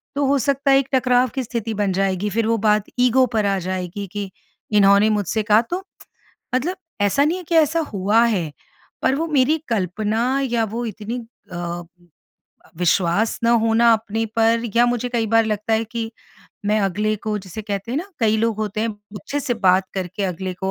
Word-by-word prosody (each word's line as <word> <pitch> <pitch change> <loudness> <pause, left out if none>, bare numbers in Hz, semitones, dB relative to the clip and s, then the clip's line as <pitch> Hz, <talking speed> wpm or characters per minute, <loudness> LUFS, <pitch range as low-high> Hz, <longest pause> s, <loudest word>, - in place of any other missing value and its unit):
तो 285 0 +1
हो 280 +1 +3
सकता 280 +1 +1
है 270 - +6
एक 270 - -2
टकराव 255 -1 +3
की 265 - -1
स्थिति 230 -2 -4
बन 205 -2 0
जाएगी। 195 +1 0
फिर 220 +2 0
वो 230 0 +2
बात 210 -1 +2 0.2
ईगो 250 +1 +4
पर 215 -2 +2
आ 200 -1 +1
जाएगी 185 +2 -4
कि, 205 -2 -4 0.4
इन्होंने 200 0 +5
मुझसे 210 0 0
कहा, 210 +1 +5
तो 350 +11 -5 0.7
मतलब 320 +9 0 0.2
ऐसा 205 +8 +3
नहीं 330 +5 0
है 365 - -9
कि 340 - -1
ऐसा 320 +1 +3
हुआ 205 +4 +3
है, 185 -10 0 0.5
पर - - +3
वो 320 +4 -1
मेरी 300 -1 +3
कल्पना 220 +5 0
या 240 -4 0
वो 225 +3 -4
इतनी 225 +3 -6 0.3
अ, 175 0 -4 1.0
विश्वास 180 +4 +1
ना 230 - +4
होना 230 +1 +4
अपने 225 0 -1
पर 230 0 +3
या 240 - +6
मुझे 245 0 -1
कई 235 -2 -1
बार 225 +1 +3
लगता 215 +1 -2
है 220 +1 +2
कि, 225 0 -5 0.6
मैं 215 +1 +2
अगले 210 +2 0
को 210 +1 -3
जिसे 200 +2 -8
कहते 200 +1 -4
हैं 275 - 0
ना 350 - -5
कई 220 -1 +3
लोग 225 0 0
होते 215 -1 -2
हैं। 225 - 0 0.3
अच्छे 290 -1 -3
से 250 -3 -1
बात 190 -3 +3
करके 190 +1 -4
अगले 185 0 -3
को 190 +1 -3
220 Hz, 195 wpm, -21 LUFS, 200-245 Hz, 1.0 s, है